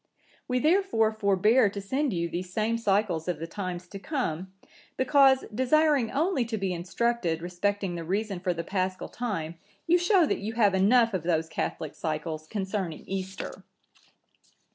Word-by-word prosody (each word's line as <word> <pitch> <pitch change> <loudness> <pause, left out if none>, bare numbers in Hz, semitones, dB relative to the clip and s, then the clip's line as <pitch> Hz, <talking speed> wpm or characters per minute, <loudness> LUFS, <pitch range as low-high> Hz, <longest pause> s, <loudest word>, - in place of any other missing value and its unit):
We 250 - 0
therefore 305 - +3
forbear 215 +2 +3
to 200 - -6
send 260 +8 -1
you 170 -3 -1
these 180 +2 -5
same 220 +4 0
cycles 195 -6 +1
of 175 -3 -1
the 165 - -5
times 180 0 -5
to 195 - -8
come, 190 - -3 0.5
because, 265 0 +4
desiring 270 +1 +3
only 310 -2 +1
to 225 -1 -3
be 195 -2 -1
instructed 175 0 -1
respecting 185 +2 -2
the 170 -1 -4
reason 195 +2 -2
for 180 0 0
the 170 -1 -3
Paschal 185 +1 -2
time, 170 -9 -4 0.3
you 350 +2 +4
show 350 0 +4
that - - -1
you 215 +3 -4
have 210 -4 +3
enough 225 +4 +4
of 185 - 0
those 165 -1 0
catholic 160 -1 -4
cycles 155 0 -4
concerning 190 -4 -3
Easter. 190 0 -5
200 Hz, 160 wpm, -27 LUFS, 175-240 Hz, 0.5 s, because